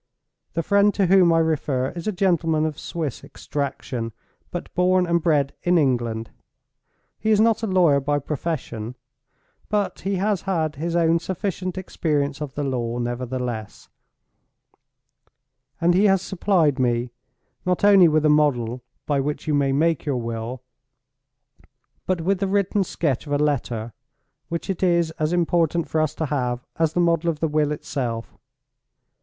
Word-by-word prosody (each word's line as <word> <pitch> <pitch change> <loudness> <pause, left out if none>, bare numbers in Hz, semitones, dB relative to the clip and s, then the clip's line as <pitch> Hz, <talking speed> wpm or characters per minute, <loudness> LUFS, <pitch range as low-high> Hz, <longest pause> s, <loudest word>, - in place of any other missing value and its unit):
The 165 - -1
friend 200 +4 +4
to 200 - +2
whom 180 -1 +5
I 165 - +4
refer 145 -5 0
is 170 +2 -7
a - - +2
gentleman 170 -5 +1
of 155 -2 -3
Swiss 155 -7 -4
extraction, 130 -5 -4 0.4
but 175 - -6
born 180 0 +3
and 170 -1 +1
bred 145 -4 +2
in 175 0 +3
England. 120 -6 0 0.9
He 220 - -1
is 215 -1 +4
not 225 0 +3
a 225 - -1
lawyer 175 -7 +4
by 145 +1 0
profession—but 135 -6 -4 1.0
he 195 0 -2
has 195 0 0
had 160 -5 0
his 170 +3 -2
own 165 0 +3
sufficient 185 +1 -3
experience 150 -6 -1
of 145 -3 -5
the 145 - -2
law, 120 -3 -2
nevertheless; 120 -2 -4 1.9
and 170 +1 +3
he 195 +4 +4
has 195 -2 +3
supplied 170 -7 +1
me, 120 -1 0 0.5
not 180 +1 0
only 200 -3 +7
with 155 -1 +2
a - - +6
model 130 -6 +2 0.2
by 145 -2 +1
which 145 +2 -3
you 155 - +1
may 140 -1 +2
make 160 +3 +1
your 140 -4 -1
will, 115 +2 -5 1.4
but 185 -2 0
with 190 +3 +1
the 195 - 0
written 200 0 +1
sketch 150 -7 -2
of 145 - -2
a - - +3
letter 120 -6 -1 0.6
which 170 0 -4
it 190 -3 -3
is 170 -3 +2
as 155 +1 +1
important 170 -1 +1
for 160 - 0
us 155 -1 -1
to 160 - -2
have, 125 -4 -2
as 160 -1 +1
the 175 - 0
model 170 -1 +2
of 155 -3 -2
the 160 - +1
will 150 -1 +1
itself. 120 -6 -4
155 Hz, 160 wpm, -23 LUFS, 135-175 Hz, 1.9 s, only